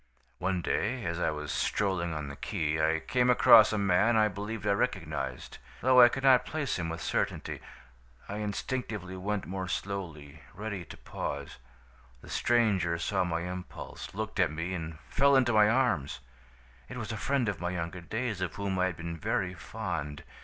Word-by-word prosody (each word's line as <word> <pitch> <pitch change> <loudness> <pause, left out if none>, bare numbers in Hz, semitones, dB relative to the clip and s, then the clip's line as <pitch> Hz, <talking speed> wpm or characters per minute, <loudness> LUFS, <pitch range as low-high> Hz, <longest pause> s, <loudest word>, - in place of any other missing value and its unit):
"One 90 -1 -1
day, 120 +2 -1
as 85 0 -2
I - - +1
was 75 -1 -4
strolling 95 -4 0
on 75 -2 -4
the 70 - -7
quay, 80 +2 0
I 80 - -3
came 125 +8 +1
across 115 -2 +8
a 110 - 0
man 100 +4 +3
I 110 -1 +4
believed 105 +2 -5
I - - +3
recognized, 100 - -2 0.2
though 130 0 +7
I 120 - +9
could 135 +2 -4
not 130 -2 +6
place 150 -10 -2
him 85 -1 -2
with 80 0 -5
certainty. - - -2 0.7
I 100 - -5
instinctively 105 -2 -3
went 100 +2 -2
more 95 +1 -4
slowly, 80 -7 -5
ready 100 -4 -5
to - - -11
pause. 70 -2 -5 0.6
The - - -13
stranger 100 -8 +2
saw 95 +2 0
my 85 -2 -1
impulse, 90 +1 -7
looked 110 0 -4
at 90 -3 +4
me, 80 +4 -4
and 80 -3 -5
fell 140 +1 +4
into 125 -3 +4
my 105 -1 +6
arms. 120 - +1 0.7
"It - - -7
was - - -4
a - - -3
friend 135 -3 0
of 95 -5 -2
my 90 - -1
younger 90 0 -4
days, 110 +3 -3
of 90 -4 -2
whom 100 -2 -2
I 90 - +3
had 90 - -5
been 85 0 -6
very 90 +4 -1
fond. 75 -2 -5
95 Hz, 180 wpm, -30 LUFS, 85-110 Hz, 0.7 s, I